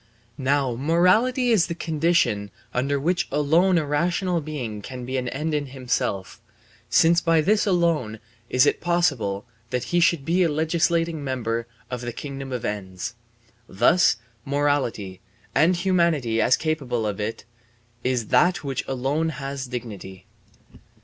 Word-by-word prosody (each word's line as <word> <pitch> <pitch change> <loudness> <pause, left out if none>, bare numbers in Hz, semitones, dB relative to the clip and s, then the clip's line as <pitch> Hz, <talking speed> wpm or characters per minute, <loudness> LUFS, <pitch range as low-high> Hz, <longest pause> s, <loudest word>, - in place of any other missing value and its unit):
Now 135 -2 +1
morality 185 - +3
is 205 -7 +4
the 170 - -4
condition 160 -11 +1 0.2
under 140 +3 0
which 175 +5 0
alone 160 +6 +3
a 160 - +1
rational 170 +4 0
being 125 -9 -5
can 125 +2 -7
be 130 +2 -4
an 125 -1 -2
end 150 +5 -3
in 145 -1 -1
himself, 125 -7 -3 0.5
since 165 +8 +4
by 165 -1 +3
this 210 +6 +2
alone 165 - +1 0.3
is 130 - +4
it - - +1
possible 140 - 0 0.2
that 125 0 -1
he 175 - +4
should 165 -4 +2
be 175 +3 +2
a 170 - +3
legislating 165 +1 0
member 115 -3 -2 0.2
in 125 - -3
the 120 0 -4
kingdom 135 0 -7
of 125 -2 -3
ends. 95 -1 -4 0.6
Thus 120 - +4 0.3
morality, 135 -10 -1 0.3
and 175 +4 +4
humanity 170 - +1
as 120 - +4
capable 140 -8 -1
of 105 -1 -3
it, 110 +2 -4 0.6
is 125 -4 -1
that 175 -3 +3
which 135 -3 -2
alone 135 +5 0
has 140 -3 -5
dignity. 100 -6 -7
140 Hz, 145 wpm, -24 LUFS, 120-170 Hz, 0.6 s, is